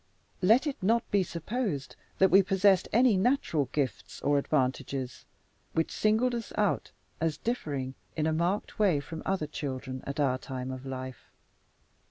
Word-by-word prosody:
Let 225 +10 +5
it 290 -3 -3
not 230 +5 +3
be 200 -2 +4
supposed 175 - -3 0.2
that 190 - +5
we 195 - +8
possessed 195 0 +3
any 240 -2 +5
natural 185 - +1
gifts, 125 -10 -2
or 145 0 +3
advantages 130 -2 -1 0.5
which 160 - 0
singled 220 +4 +2
us 235 -2 -4
out 210 -2 +1 0.3
as 160 -2 0
differing 145 - -3 0.2
in 155 - 0
a 160 - +2
marked 175 +8 -1
way 190 -8 +4
from 160 +3 -7
other 190 -5 0
children 130 -3 -5
at 140 +1 -4
our 130 -3 +2
time 130 -1 -5
of 130 +1 -7
life. 130 -1 -7
160 Hz, 155 wpm, -29 LUFS, 135-205 Hz, 0.5 s, we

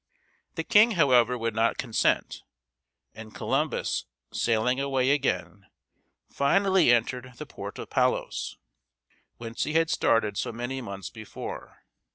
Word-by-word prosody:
The 165 - -2
king, 215 +6 +5
however, 125 - +4
would 115 -1 -2
not 115 +1 +1
consent, 115 -4 0 0.7
and 110 -1 -11
Columbus, - - -1 0.3
sailing 120 +3 +1
away 135 -1 +1
again, 95 - -1 0.6
finally 190 +1 +3
entered 125 +2 0
the - - -7
port - - -8
of - - -8
Palos, - - 0 0.8
whence 115 0 -4
he 150 - -3
had 165 0 +2
started 105 -3 +1
so - - -2
many 120 +3 -4
months 100 -4 -7
before. 110 -2 -9
120 Hz, 125 wpm, -27 LUFS, 115-140 Hz, 0.8 s, king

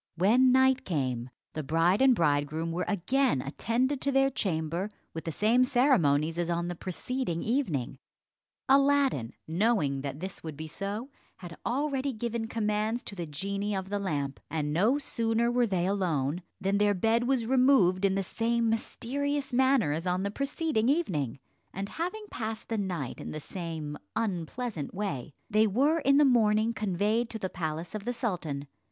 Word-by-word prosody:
When 235 +9 +5
night 260 0 +4
came, 130 -7 -2 0.2
the 155 - -3
bride 165 - +2
and 265 -2 +6
bridegroom 155 0 +1
were 175 +2 -2
again 245 - +1
attended 240 - -1
to 280 - +1
their 270 0 +3
chamber 170 -2 -2 0.2
with 160 - -6
the 165 - -2
same 225 +9 +3
ceremonies 170 - +3
as 175 0 -1
on 170 0 -1
the - - -2
preceding 185 +1 -3
evening. 215 - -1 0.7
Aladdin, 275 - +3
knowing 165 - +1
that 140 +1 -5
this 190 +2 -6
would 155 -3 -7
be 160 - -5
so, 205 - -4 0.3
had 175 -2 -9
already 275 +1 0
given 235 +1 -3
his - - -9
commands 215 +1 -1
to 200 - -7
the 170 -3 -4
genie 200 +7 -3
of 190 0 -4
the 205 0 -1
lamp; 145 -8 -2
and 150 -2 -2
no 215 - +3
sooner 235 -4 0
were 245 -1 +2
they 185 -4 0
alone 175 -5 0 0.2
than 195 +1 +1
their 205 -1 +3
bed 225 +5 +2
was 260 -4 +1
removed 250 -8 +4
in 195 -1 +3
the 195 - 0
same 230 +3 0
mysterious 275 +5 -2
manner 260 - +3
as 165 +4 -2
on 180 +1 0
the 200 - -1
preceding 275 -2 0
evening; 160 - 0 0.3
and 195 +2 -5
having 365 - -4
passed 220 -1 -5
the 225 - -1
night 175 -9 -3
in - - -6
the 155 - -5
same 160 -3 -5 0.2
unpleasant 195 - -3
way, 150 -9 -4
they 215 +1 +3
were 280 +11 +2
in 275 -2 +4
the 295 - +6
morning 225 -3 +3
conveyed 215 +3 0
to 225 - -5
the 190 -3 -3
palace 165 +1 -4
of 215 -1 -5
the 245 - -1
sultan. 175 - -3
205 Hz, 170 wpm, -29 LUFS, 165-245 Hz, 0.7 s, and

